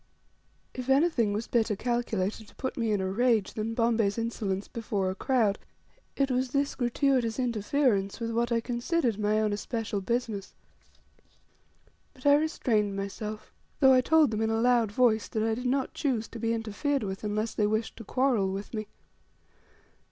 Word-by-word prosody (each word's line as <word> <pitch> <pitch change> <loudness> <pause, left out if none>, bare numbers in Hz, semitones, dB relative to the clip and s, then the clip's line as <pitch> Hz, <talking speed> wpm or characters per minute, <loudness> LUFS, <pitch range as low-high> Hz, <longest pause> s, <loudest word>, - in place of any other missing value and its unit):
If 255 0 -6
anything 270 -6 +3
was 210 +3 -2
better 225 -3 +1
calculated 220 -3 -2
to - - -19
put 260 - -4
me 230 -3 0
in 205 -2 +1
a 190 0 -1
rage 225 -1 +2
than 225 +1 -3
Bombay's 230 -3 +1
insolence 210 -4 -2
before 210 -5 -2
a - - -3
crowd 220 -2 +1 0.6
it 275 -1 +1
was 255 0 0
this 280 +2 0
gratuitous 245 -2 +1
interference 230 -4 0
with 230 -1 -3
what 235 +1 0
I 230 -1 +2
considered 240 - -1
my 210 +1 +2
own 215 -1 +1
especial 210 -1 -3
business; 215 -1 -3 1.6
but 255 - -17
I 285 - +7
restrained 235 -9 +1
myself, 210 +2 -6 0.3
though 265 -2 +7
I 255 - +5
told 310 -1 +4
them, 215 0 -1
in 220 - +1
a 225 0 +1
loud 235 -3 +3
voice, 220 -1 +2
that 220 - -2
I 225 0 +1
did 250 +3 -3
not 265 +1 0
choose 245 -7 -1
to 230 - -8
be 230 0 0
interfered 230 +5 -1
with, 190 0 -5
unless 215 +2 -1
they 210 - +1
wished 220 +1 -1
to 230 - -8
quarrel 235 -4 +1
with 195 +4 -6
me. 215 -2 -4
230 Hz, 175 wpm, -28 LUFS, 210-250 Hz, 1.6 s, I